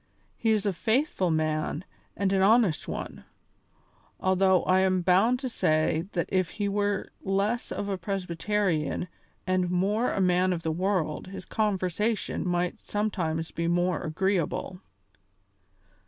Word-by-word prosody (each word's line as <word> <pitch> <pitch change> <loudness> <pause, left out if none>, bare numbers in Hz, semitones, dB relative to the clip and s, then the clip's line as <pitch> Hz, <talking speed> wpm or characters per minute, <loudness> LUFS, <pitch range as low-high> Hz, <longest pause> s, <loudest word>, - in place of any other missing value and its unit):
He 225 - -1
is 215 -2 +2
a 200 - +1
faithful 220 - +1
man 155 0 -1 0.3
and 195 -1 +1
an 190 - +3
honest 210 -4 +3
one, - - -6 1.0
although 190 0 +3
I 185 +1 +3
am 185 -1 +2
bound 195 +8 +4
to 265 - -2
say 155 -6 +1
that 170 - -1
if 185 -3 +1
he 205 -1 0
were 205 0 -1
less 200 +5 -1
of 200 - -3
a 195 -2 -2
Presbyterian 180 -2 -1 0.4
and 185 -1 +1
more 200 +7 +1
of - - -3
a - - +2
man 180 0 +3
of 170 -1 -4
the 160 - 0
world 180 -2 -1
his 185 -1 -8
conversation 210 -1 -1
might 175 0 -1
sometimes 175 -7 -2
be 170 0 -2
more 175 0 +1
agreeable." 180 +1 -1
185 Hz, 140 wpm, -27 LUFS, 175-205 Hz, 1.0 s, bound